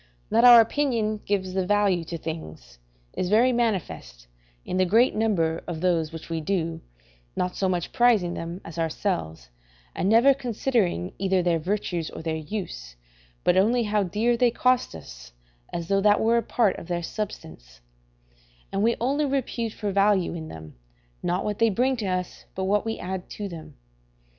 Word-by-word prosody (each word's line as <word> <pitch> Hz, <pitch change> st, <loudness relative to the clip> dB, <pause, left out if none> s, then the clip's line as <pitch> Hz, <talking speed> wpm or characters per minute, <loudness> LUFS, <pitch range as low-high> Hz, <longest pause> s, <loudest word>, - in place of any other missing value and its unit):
That 230 Hz, -, +4 dB
our 240 Hz, -1 st, +10 dB
opinion 225 Hz, -4 st, 0 dB
gives 190 Hz, -2 st, -1 dB
the 190 Hz, 0 st, 0 dB
value 200 Hz, -2 st, +2 dB
to 170 Hz, +1 st, -5 dB
things 80 Hz, -, -8 dB, 0.3 s
is 180 Hz, -, -2 dB
very 230 Hz, +5 st, +4 dB
manifest 80 Hz, -, -2 dB, 0.4 s
in 185 Hz, -, -3 dB
the 185 Hz, -, +4 dB
great 230 Hz, +7 st, +4 dB
number 170 Hz, -7 st, 0 dB
of 170 Hz, -3 st, -4 dB
those 165 Hz, -3 st, +1 dB
which 165 Hz, -1 st, -9 dB
we 165 Hz, -1 st, -3 dB
do, 165 Hz, -1 st, -2 dB, 0.5 s
not 180 Hz, 0 st, -2 dB
so 190 Hz, -, 0 dB
much 175 Hz, -2 st, -2 dB
prizing 230 Hz, -9 st, +3 dB
them, 170 Hz, +3 st, -6 dB
as 165 Hz, 0 st, -8 dB
ourselves, 160 Hz, -, -3 dB, 0.4 s
and 190 Hz, -, 0 dB
never 235 Hz, +5 st, +6 dB
considering 235 Hz, -, -1 dB
either 190 Hz, -1 st, +1 dB
their 170 Hz, -2 st, +1 dB
virtues 175 Hz, -2 st, -2 dB
or -, -, -9 dB
their 160 Hz, -1 st, -2 dB
use, 150 Hz, -, -6 dB, 0.5 s
but 180 Hz, -, +3 dB
only 235 Hz, +5 st, +3 dB
how 210 Hz, -1 st, +1 dB
dear 215 Hz, +6 st, +1 dB
they 245 Hz, +1 st, +3 dB
cost 250 Hz, -, +1 dB
us, -, -, -12 dB, 0.4 s
as 170 Hz, -1 st, -4 dB
though 195 Hz, +1 st, +2 dB
that 205 Hz, 0 st, +4 dB
were 230 Hz, +1 st, +3 dB
a -, -, +2 dB
part 220 Hz, -2 st, +1 dB
of -, -, -11 dB
their 175 Hz, -1 st, -2 dB
substance; 80 Hz, -, -7 dB, 0.9 s
and 195 Hz, -, -1 dB
we 230 Hz, +2 st, +3 dB
only 280 Hz, +5 st, +1 dB
repute 250 Hz, -4 st, -2 dB
for 210 Hz, -1 st, -4 dB
value 195 Hz, -2 st, +2 dB
in 160 Hz, -2 st, -6 dB
them, 80 Hz, -, -10 dB, 0.5 s
not 180 Hz, +2 st, -1 dB
what 210 Hz, -1 st, -3 dB
they 230 Hz, -, +4 dB
bring 250 Hz, +6 st, +1 dB
to 215 Hz, -4 st, -3 dB
us, 185 Hz, -1 st, -3 dB
but 190 Hz, -, -2 dB
what 205 Hz, +3 st, +1 dB
we 225 Hz, -, -2 dB
add 185 Hz, 0 st, -5 dB
to 205 Hz, -, -5 dB
them. 165 Hz, -4 st, -10 dB
190 Hz, 175 wpm, -25 LUFS, 165-225 Hz, 0.9 s, our